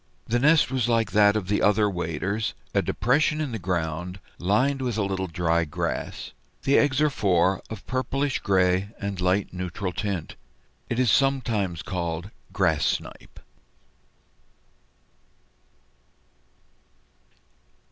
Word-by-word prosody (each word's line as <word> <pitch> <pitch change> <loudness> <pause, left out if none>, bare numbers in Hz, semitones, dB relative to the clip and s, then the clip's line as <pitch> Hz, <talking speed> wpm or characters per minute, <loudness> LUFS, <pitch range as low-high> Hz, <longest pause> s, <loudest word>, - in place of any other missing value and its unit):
The 120 +2 +1
nest 150 0 +4
was 125 -3 0
like 115 -1 +1
that 105 -1 +5
of 105 -4 -2
the 105 +1 +1
other 105 +1 +4
waders, 95 +2 -2 0.2
a - - +3
depression 140 - +1
in 150 -4 -2
the 110 - -4
ground, 90 0 -3 0.2
lined 130 +10 +1
with 120 -4 -2
a 105 - +1
little 95 -1 -2
dry 85 0 +1
grass. 75 - -4 0.3
The 140 - +3
eggs 145 -2 +2
are 150 - +4
four, 95 -5 +2
of 110 - -8
pale 130 0 -1
purplish 135 +1 -1
gray 95 0 +2
and 100 -2 -4
light 90 +2 +1
neutral 90 +1 -4
tint. 100 -5 -3 0.5
It 120 - -1
is 125 -3 +3
sometimes 115 -10 +1
called 90 -1 -4 0.2
Grass 80 -7 +1
Snipe. - - -3
100 Hz, 125 wpm, -25 LUFS, 90-120 Hz, 0.5 s, that